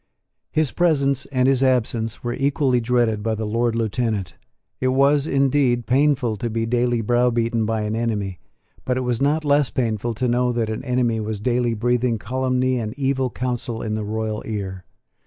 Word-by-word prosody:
His 155 -3 +1
presence 140 -6 +1
and 130 -2 +1
his 135 -1 +3
absence 115 -4 0
were 120 0 -2
equally 135 -2 +1
dreaded 115 -3 +1
by 110 +1 -1
the 110 0 -3
Lord 115 +2 0
Lieutenant. 110 -5 -1 0.5
It 130 - 0
was, 140 +3 +3
indeed, 135 -4 +2
painful 130 -3 +2
to 120 +4 -3
be 115 0 -1
daily 120 0 +1
browbeaten 115 -1 +1
by 110 -1 0
an 105 +1 -2
enemy: 105 -5 -2 0.4
but 125 0 -1
it - - 0
was 125 -1 -1
not 150 +3 +1
less 145 -1 +3
painful 115 -2 -1
to 125 +3 -1
know 125 +1 +2
that 115 -2 -1
an 110 - -4
enemy 125 -3 0
was 110 -1 -3
daily 120 +1 0
breathing 120 +1 +1
calumny 130 +3 0
and 110 +1 -5
evil 135 -2 0
counsel 120 -2 -3
in 110 - -2
the 110 0 -2
royal 110 0 -3
ear. 95 -4 -5
120 Hz, 175 wpm, -22 LUFS, 110-130 Hz, 0.5 s, his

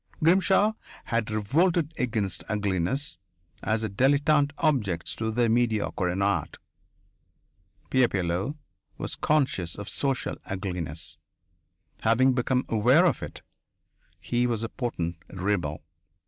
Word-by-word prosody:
Grimshaw 190 +5 +4 0.3
had 115 -1 -1
revolted 155 - +1
against 110 -6 -2
ugliness 100 - -1 0.4
as 110 0 0
a - - 0
dilettante 140 +6 +3
objects 105 - 0
to 110 0 -1
the 120 +2 +2
mediocre 110 -5 +1
in 95 +2 0
art. 100 0 0 1.3
Pierre 130 -2 +5
Pilleux 95 - -1 0.4
was - - -3
conscious 130 - +1
of 100 -1 -7
social 135 -2 -1
ugliness. 90 -5 -4 0.8
Having 130 +4 +4
become 125 +1 +1
aware 125 - +4
of 175 - +2
it, - - -8 0.8
he 120 0 0
was 115 -2 -1
a 115 - -2
potent 85 -9 -3
rebel. 90 -6 -2
115 Hz, 115 wpm, -27 LUFS, 95-135 Hz, 1.3 s, Pierre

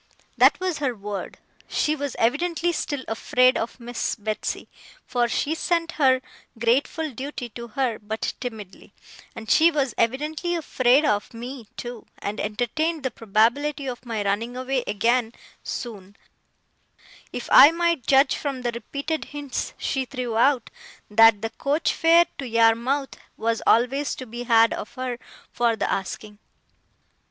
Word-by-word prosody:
that - - +5
was 365 -4 -2
her 265 -4 -1
word. 200 -2 -6 0.3
She 305 - 0
was 285 -3 -4
evidently 335 +8 +1
still 285 -4 -3
afraid 255 +3 +3
of 230 +3 -3
Miss 240 0 -3
Betsey, 215 -1 -4 0.4
for 245 -1 +1
she 290 +6 -1
sent 335 +1 0
her 260 -2 +5 0.4
grateful 270 +7 +1
duty 260 0 -6
to 235 +1 -8
her 235 -1 -1
but 220 +1 -3
timidly; 220 -6 -8 0.4
and 220 - -8
she 325 +8 +6
was 280 -7 -1
evidently 300 +9 0
afraid 270 -3 +3
of 210 -1 0
me, 240 0 -7
too, 240 -2 -7
and 205 +1 -5
entertained 285 +9 -1
the 260 - -1
probability 235 +8 +1
of 250 -2 -5
my 225 -4 -3
running 225 +5 -1
away 255 0 -1
again 230 +3 +1 0.3
soon: 205 -5 -6 1.2
if - - -6
I 285 - +10
might 335 -4 0
judge 270 +1 +5
from 275 -3 -4
the 240 - 0
repeated 280 +7 -4
hints 290 -2 -5
she 265 -1 -2
threw 250 -3 -4
out, 250 +1 +2 0.4
that 225 -1 +6
the 225 - -2
coach 290 +4 0
fare 335 +1 +5
to 270 - -4
Yarmouth 230 +4 +2 0.2
was 230 0 -1
always 265 +5 +2
to 255 - -8
be 240 +1 -7
had 230 -1 +5
of - - -7
her 255 -2 -4 0.3
for 235 -1 +1
the - - -1
asking. 205 +2 -4
245 Hz, 145 wpm, -24 LUFS, 225-285 Hz, 1.2 s, I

